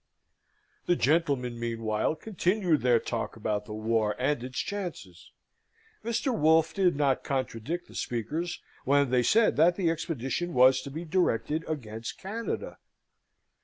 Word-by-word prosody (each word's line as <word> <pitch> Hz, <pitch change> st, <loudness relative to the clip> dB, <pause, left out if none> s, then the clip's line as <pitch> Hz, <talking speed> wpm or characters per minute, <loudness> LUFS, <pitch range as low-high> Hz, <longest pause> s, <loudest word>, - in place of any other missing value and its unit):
The 175 Hz, -, +4 dB
gentlemen, 140 Hz, -7 st, +1 dB
meanwhile, 115 Hz, +2 st, -1 dB
continued 180 Hz, -3 st, 0 dB
their 120 Hz, -2 st, +4 dB
talk -, -, -4 dB
about 105 Hz, -2 st, -2 dB
the 105 Hz, -, -7 dB
war 110 Hz, -1 st, 0 dB
and 130 Hz, 0 st, 0 dB
its 130 Hz, +1 st, -7 dB
chances. 175 Hz, -, -5 dB, 0.7 s
Mr. 235 Hz, +3 st, 0 dB
Wolfe 160 Hz, 0 st, +4 dB
did 185 Hz, -5 st, +2 dB
not 140 Hz, -2 st, +1 dB
contradict 135 Hz, +5 st, -3 dB
the -, -, -15 dB
speakers 155 Hz, +9 st, -3 dB, 0.2 s
when 140 Hz, -1 st, +3 dB
they 125 Hz, -1 st, +4 dB
said 215 Hz, -, +3 dB
that 170 Hz, +3 st, +5 dB
the 175 Hz, -4 st, +1 dB
expedition 165 Hz, +1 st, -3 dB
was 130 Hz, +1 st, +6 dB
to 140 Hz, -, -7 dB
be 160 Hz, +5 st, -6 dB
directed 160 Hz, -2 st, 0 dB
against 115 Hz, -7 st, -5 dB
Canada. 220 Hz, +5 st, -5 dB
145 Hz, 135 wpm, -28 LUFS, 120-175 Hz, 0.7 s, was